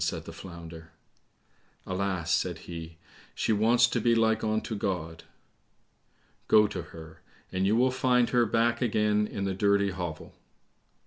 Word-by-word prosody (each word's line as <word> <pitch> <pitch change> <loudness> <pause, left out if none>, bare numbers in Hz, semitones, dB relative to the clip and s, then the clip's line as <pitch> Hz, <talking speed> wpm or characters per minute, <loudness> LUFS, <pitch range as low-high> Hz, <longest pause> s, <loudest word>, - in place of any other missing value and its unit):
said - - -3
the - - -9
Flounder. 85 -2 -10 1.0
"Alas," 95 -3 -2
said - - 0
he, 85 -1 -8 0.4
"she 110 - +1
wants 115 +3 +4
to 120 0 -1
be 115 +1 +3
like 110 -1 +2
unto 110 +1 -1
God." 80 -5 -4 1.2
"Go 105 0 +6
to - - -4
her, 80 -1 -12 0.3
and 95 +1 0
you 105 - +3
will 125 +2 +3
find 125 -2 +2
her 120 -2 +3
back 115 +2 +1
again 105 -3 +1
in 100 - -5
the 95 -1 -1
dirty 100 +1 +2
hovel." 90 -4 -6
100 Hz, 145 wpm, -28 LUFS, 90-115 Hz, 1.2 s, Go